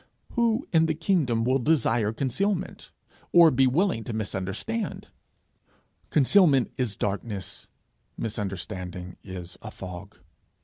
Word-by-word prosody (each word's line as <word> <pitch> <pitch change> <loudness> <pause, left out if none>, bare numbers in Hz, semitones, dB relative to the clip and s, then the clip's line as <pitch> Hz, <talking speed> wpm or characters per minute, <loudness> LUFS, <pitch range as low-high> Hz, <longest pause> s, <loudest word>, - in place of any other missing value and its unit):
Who 235 +1 +1
in 160 -1 +5
the 160 - 0
kingdom 150 -9 +1
will 130 +3 +2
desire 120 -6 +2
concealment, 140 - -2 0.4
or 170 -2 +8
be 130 +1 +4
willing 155 - +1
to 120 - -4
misunderstand? 110 - -3 1.0
Concealment 150 -2 +4
is 120 -6 -1
darkness; 100 -1 -4 0.5
misunderstanding 95 -4 -5
is 90 -2 -8
a - - -7
fog. 95 +2 -9
120 Hz, 105 wpm, -26 LUFS, 100-160 Hz, 1.0 s, or